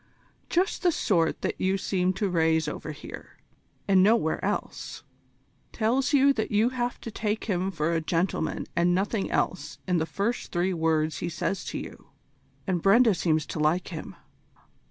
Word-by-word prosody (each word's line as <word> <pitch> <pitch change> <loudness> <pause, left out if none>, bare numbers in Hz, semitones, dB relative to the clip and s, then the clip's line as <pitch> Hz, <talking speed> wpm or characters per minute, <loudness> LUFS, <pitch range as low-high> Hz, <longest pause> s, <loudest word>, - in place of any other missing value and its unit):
Just 370 +4 +1
the 355 - +4
sort 170 - +1
that - - -2
you 190 +1 +2
seem 185 -1 0
to 200 +2 -1
raise 160 -3 +2
over 150 +1 -5
here, 145 - -10 0.5
and 190 -2 +5
nowhere 200 -5 +3
else. - - -3 0.7
Tells 245 +4 +1
you 280 -1 +5
that 220 -4 -2
you 215 +3 +3
have 245 -1 -3
to 230 - -6
take 210 0 -2
him 190 -3 -1
for 165 -2 -1
a 165 - +1
gentleman 165 +1 -1
and 175 +1 +3
nothing 200 +2 -1
else 185 - -1
in 180 -1 +2
the 160 - -1
first 220 +8 -2
three 180 +1 0
words 160 -3 0
he 175 - -2
says 180 +3 -2
to - - -4
you - - -9 0.6
and 180 -4 0
Brenda 220 +4 +5
seems 160 -3 +1
to - - -5
like 155 +4 +1
him. 165 -4 -7
185 Hz, 170 wpm, -27 LUFS, 165-215 Hz, 0.7 s, and